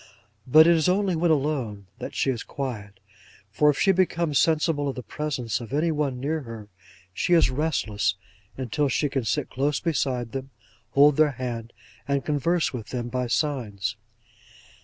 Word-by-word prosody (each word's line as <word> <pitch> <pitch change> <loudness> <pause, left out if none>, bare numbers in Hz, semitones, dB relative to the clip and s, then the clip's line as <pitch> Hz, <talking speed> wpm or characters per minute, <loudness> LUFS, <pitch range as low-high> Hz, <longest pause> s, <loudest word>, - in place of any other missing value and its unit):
But 155 +5 +8
it 170 0 +6
is 160 +2 +2
only 190 -1 +1
when 170 +1 +1
alone, 135 -9 0
that - - -6
she 135 - +1
is 120 -2 -4
quiet: 105 -8 -6 0.5
for 150 +9 +3
if 145 - +1
she 195 - +4
becomes 170 -5 +1
sensible 155 -3 +2
of 135 - -4
the 125 - -6
presence 125 -8 -3
of 115 - -9
any 160 +3 +2
one 145 -5 -1
near 155 +5 -1
her, 115 -5 -9 0.4
she 175 - 0
is 165 -6 +5
restless 120 - 0 0.4
until 135 +3 -1
she 145 +3 +1
can 135 -3 -2
sit 135 +6 -1
close 140 +2 0
beside 130 -8 -1
them, 135 +1 -5 0.4
hold 145 0 +6
their 155 -2 +4
hand, 120 -2 -5 0.4
and 140 -1 0
converse 155 +3 +1
with 115 -5 -6
them 120 +1 -4
by 125 0 -2
signs. 110 -7 -1
140 Hz, 170 wpm, -25 LUFS, 120-155 Hz, 0.5 s, But